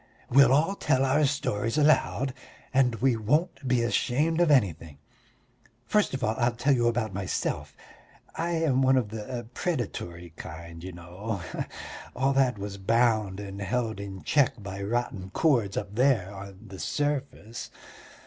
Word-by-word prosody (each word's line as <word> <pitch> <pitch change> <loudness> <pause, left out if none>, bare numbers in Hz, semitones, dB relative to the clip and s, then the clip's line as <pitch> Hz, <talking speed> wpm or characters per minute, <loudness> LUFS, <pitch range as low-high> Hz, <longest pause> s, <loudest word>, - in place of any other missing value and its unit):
We'll 135 0 +7
all 155 +8 +3
tell 135 -8 +1
our 145 +3 +3
stories 115 -5 -1
aloud, 140 -3 +3 0.4
and 130 -3 +3
we 125 +1 +2
won't 140 - 0
be 125 -2 +2
ashamed 150 +8 +1
of 175 - +4
anything. 85 - +2 0.9
First 210 -9 +2
of 135 - -5
all 110 - +2
I'll 120 0 +2
tell 135 +4 +2
you 120 -2 +2
about 115 -3 0
myself. 95 -1 -3 0.6
I 170 +1 -1
am 155 -6 +2
one 130 0 +4
of 120 -5 0
the 110 +2 -5
predatory 90 - -3
kind, 85 +1 -9
you 95 - -6
know. 90 +3 -6 0.7
All 135 +2 +2
that 130 -4 +2
was 100 0 -6
bound 110 -2 +2
and 100 0 -7
held 110 +2 -1
in 100 -2 -7
check 130 -7 +2
by 100 0 -6
rotten 100 -3 -2
cords 120 -11 +2
up 100 -1 -3
there 110 -5 +2
on 100 -1 -10
the 95 - -9
surface. 140 -6 -3
120 Hz, 150 wpm, -27 LUFS, 100-135 Hz, 0.9 s, We'll